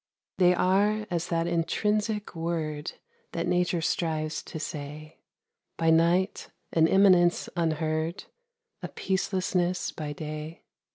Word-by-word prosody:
They 180 -1 +5
are 205 +4 +2
as 170 0 -1
that 165 -1 0
intrinsic 210 +5 -1
word 160 -2 -3 0.4
That - - -1
Nature 180 -1 +1
strives 155 -2 -1
to 160 - -8
say 150 0 -7 0.6
By 165 -1 +3
night 175 +4 +2 0.2
an 160 -1 +5
immanence 180 -2 +4
unheard, 160 0 -1 0.6
A - - -4
peacelessness 185 -2 -1
by 150 -2 -4
day. 155 +2 -7
170 Hz, 110 wpm, -27 LUFS, 155-185 Hz, 0.6 s, They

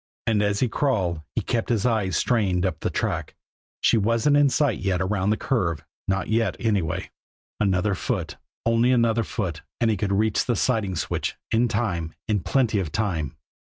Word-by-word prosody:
And 110 -2 +2
as 100 0 +1
he 130 - +3
crawled, 100 - 0
he - - +1
kept 115 -2 -1
his 115 -3 +1
eyes 105 -8 +1
strained 100 -7 +1
up 85 -5 -2
the - - -1
track - - -2 0.5
she - - +4
wasn't 115 +7 +2
in 145 -1 +5
sight 140 -6 +1
yet 95 -2 0
around 95 +1 0
the 110 - +2
curve 85 - -1 0.2
not 95 -1 0
yet, 115 +1 +1
anyway. 100 -9 -1 0.5
Another 100 0 +2
foot, - - -3 0.3
only 115 +2 +3
another 115 -2 +3
foot, 90 -9 -3 0.2
and 115 -2 +3
he 105 - 0
would 100 -2 0
reach 105 +2 +2
the 120 - +1
siding 110 -8 0
switch - - -2 0.2
in 115 +2 +3
time 95 -8 -2
in 105 -2 +1
plenty 115 +2 +1
of 85 -6 -3
time. 90 -8 -2
105 Hz, 180 wpm, -24 LUFS, 95-115 Hz, 0.5 s, in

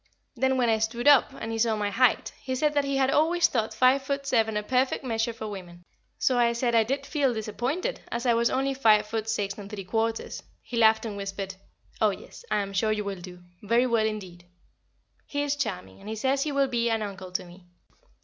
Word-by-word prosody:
Then 265 +1 +1
when 245 -2 +2
I 220 -1 +2
stood 235 +4 -1
up, 285 -3 +6
and 225 - -6
he 225 - -3
saw 225 -1 +2
my 205 -1 -1
height, 250 +4 +2
he 260 0 -3
said 300 +3 +1
that 285 -1 +1
he 275 0 0
had 270 0 +2
always 335 +3 +3
thought 225 -3 -1
five 260 +2 +4
foot 275 +1 -3
seven 225 -5 +1
a 210 - -1
perfect 255 +5 +1
measure 230 -2 -1
for 220 -1 -7
women, 175 -4 -9 0.3
so 255 -2 +2
I 235 -1 +3
said 235 0 0
I 225 -1 +5
did 275 +5 -2
feel 275 -4 0
disappointed, 250 - -3
as 235 +2 -3
I 240 - +4
was 235 0 +2
only 270 +1 0
five 220 -5 +4
foot 220 +1 -3
six 200 -3 -1
and 200 -1 -8
three 205 -2 -6
quarters; 225 +4 -2 0.2
he 245 - -7
laughed 220 0 +4
and 210 -3 -5
whispered, 195 -1 -5 0.5
"Oh - - +5
yes, - - -9
I 210 - +1
am 195 0 -5
sure 215 +3 +1
you 210 -1 -1
will 195 -3 -5
do 180 0 -11 0.2
very 235 +4 +2
well 230 -3 +2
indeed." 185 -5 -6 0.8
He 285 0 -1
is 290 0 0
charming, 215 -12 -4
and 200 +2 -10
he 220 - -3
says 265 +5 0
he 300 - -1
will 280 -1 +2
be 235 -2 0
an 225 -1 0
uncle 190 -3 -7
to 180 - -2
me. 175 +1 -16
225 Hz, 230 wpm, -27 LUFS, 210-265 Hz, 0.8 s, up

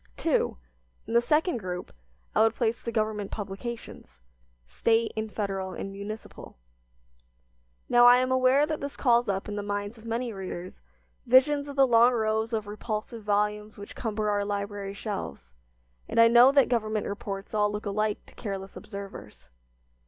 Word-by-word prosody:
II. - - +2 0.5
In 225 - -6
the 235 - +5
second 300 +5 +1
group 180 -4 -6 0.4
I 215 - +3
would 225 0 +3
place 230 -1 0
the 235 - -4
government 215 -2 -1
publications, 200 - -7 0.5
State 225 - +1
and 220 -1 -3
Federal 195 -3 -3
and 195 - -5
municipal. 200 - -8 1.3
Now 240 0 +6
I 245 0 +8
am 255 +1 +1
aware 260 +3 +4
that 310 0 -3
this 280 0 -5
calls 240 -3 +3
up 195 -1 -2
in 210 0 -4
the - - -1
minds 205 +2 -4
of 220 - -15
many 230 +1 -2
readers 185 -2 -7 0.5
visions 285 +3 +4
of 280 - -7
the 275 -1 +6
long 240 0 +5
rows 220 0 0
of 220 -2 -1
repulsive 215 +2 -5
volumes 210 +1 -1
which 205 0 -10
cumber 215 -2 -1
our 205 0 +1
library 200 -1 -4
shelves, 70 - -6 0.6
and - - 0
I 230 - +9
know 240 +3 +7
that 280 -2 +5
government 215 -3 0
reports 200 0 -5
all 210 -1 +2
look 210 +1 -5
alike 210 +1 -1
to - - -18
careless 195 -3 -6
observers. 200 - -9
215 Hz, 165 wpm, -27 LUFS, 200-235 Hz, 1.3 s, I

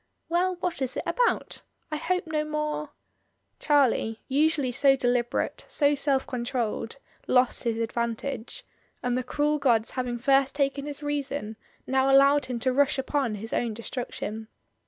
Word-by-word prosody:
"Well! 360 +2 +1
what 350 -6 -2
is 260 -1 -1
it - - -2
about? - - 0 0.3
I 305 - -1
hope 360 +4 -1
no 310 -1 -1
more 300 -1 -3 0.4
" - - -48
Charlie, 260 -6 +2
usually 285 -1 +2
so 270 +2 +4
deliberate, 245 -2 0
so 290 -1 +3
self 275 -1 +1
controlled, 240 -2 -3 0.3
lost 250 0 +3
his 230 -1 0
advantage, 235 - -3 0.4
and 245 0 0
the 255 - 0
cruel 295 +4 0
gods 235 -5 +2
having 250 -2 -2
first 270 +2 +2
taken 280 0 0
his 290 0 -5
reason, 285 -6 -3 0.3
now 265 +1 +2
allowed 275 +1 +5
him 250 -2 -3
to 255 +1 +1
rush 280 +1 +3
upon 265 -4 -1
his 220 +3 -6
own 230 -3 -1
destruction. 220 -2 -5
270 Hz, 155 wpm, -27 LUFS, 240-290 Hz, 0.4 s, allowed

